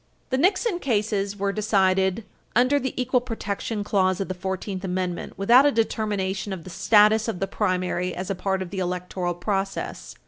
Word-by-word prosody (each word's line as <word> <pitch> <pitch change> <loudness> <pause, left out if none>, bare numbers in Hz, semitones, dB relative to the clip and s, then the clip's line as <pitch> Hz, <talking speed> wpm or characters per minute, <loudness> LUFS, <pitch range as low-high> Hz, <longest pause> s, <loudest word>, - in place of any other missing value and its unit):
The 260 - +2
Nixon 370 - +2
cases 205 - -1
were 200 0 0
decided 190 -1 +2 0.3
under 255 +5 +4
the 260 -1 -4
equal 250 0 +2
protection 220 -2 -4
clause 190 -2 +1
of 195 - -3
the - - -1
Fourteenth 190 +1 -4
Amendment 180 -1 -3
without 240 +8 +6
a - - +4
determination 205 -4 -1
of 185 -4 -5
the 185 - -9
status 215 +4 +4
of 220 -6 -3
the 195 - 0
primary 185 -3 -1
as 185 +2 -4
a - - +1
part 190 0 -1
of 175 - -10
the 195 - -4
electoral 180 0 -2
process. 195 +2 -3
195 Hz, 175 wpm, -24 LUFS, 185-220 Hz, 0.3 s, without